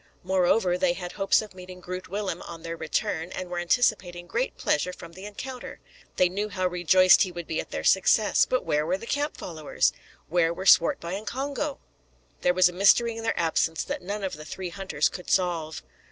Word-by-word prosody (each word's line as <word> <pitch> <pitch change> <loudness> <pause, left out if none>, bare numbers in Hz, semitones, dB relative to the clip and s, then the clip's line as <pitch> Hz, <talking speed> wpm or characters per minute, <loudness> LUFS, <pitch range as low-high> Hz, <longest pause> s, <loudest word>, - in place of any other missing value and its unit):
Moreover, 180 0 +2
they 180 -2 +2
had 175 -1 -6
hopes 195 +2 +2
of 210 - -12
meeting 185 0 -11
Groot 185 +1 -7
Willem 200 0 -3
on 165 -1 -9
their 165 0 -4
return, 160 +1 -2
and 185 -1 -6
were 175 - -2
anticipating 175 -2 +1
great - - -2
pleasure 165 +5 0
from 170 -2 -11
the 190 +3 -10
encounter. 250 +5 -8 0.4
They 180 - +4
knew 200 +4 -3
how 185 -3 -2
rejoiced 180 +1 +5
he 185 - +2
would 175 -1 -7
be 160 - -3
at - - -12
their - - -4
success. 200 +3 +4
But 255 - 0
where 150 0 +1
were 175 +4 0
the 215 - -10
camp 290 +5 -2
followers? 160 -4 -1 0.3
Where 170 0 +1
were 190 - -6
Swartboy 170 -1 +4
and 205 +2 -5
Congo? 280 +2 -3 0.6
There 180 - +2
was 185 0 +6
a 180 - -4
mystery 215 +5 +4
in 225 - -6
their 225 0 -1
absence 160 -1 +1
that - - -4
none 200 +3 -4
of 185 -5 -3
the 155 - -9
three 180 +4 -6
hunters 170 -5 0
could 180 - -8
solve. 170 -4 0
180 Hz, 205 wpm, -26 LUFS, 175-200 Hz, 0.6 s, was